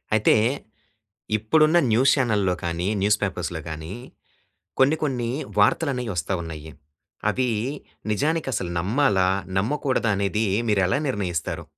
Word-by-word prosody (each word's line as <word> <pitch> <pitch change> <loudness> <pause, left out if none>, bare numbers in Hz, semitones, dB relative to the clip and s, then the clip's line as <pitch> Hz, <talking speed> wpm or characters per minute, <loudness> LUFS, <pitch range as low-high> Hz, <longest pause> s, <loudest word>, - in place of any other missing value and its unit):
అయితే 110 - +4 1.0
ఇప్పుడున్న 155 +10 +3
న్యూస్ 125 +5 +5
చానెల్‌లో 105 -8 +1
గాని, 85 +1 -2
న్యూస్ 105 +1 +3
పేపర్స్‌లో 90 -3 -3
గాని 80 +3 -6 0.9
కొన్ని, 135 +4 +5
కొన్ని 125 -5 -1 0.3
వార్తలనేయి 125 -8 +2
వస్తా 85 +3 -2
ఉన్నాయి. 80 -2 -8 0.6
అవి 130 -1 0 0.6
నిజానికి 150 +9 0
అసలు 95 -5 -2
నమ్మాలా? 100 -1 +2 0.3
నమ్మకూడదా? 125 +1 0
అనేది 100 +2 0 0.2
మీరు 105 -3 +2
ఎలా 95 - +1
నిర్ణయిస్తారు? 90 - -2
105 Hz, 110 wpm, -24 LUFS, 90-130 Hz, 1.0 s, న్యూస్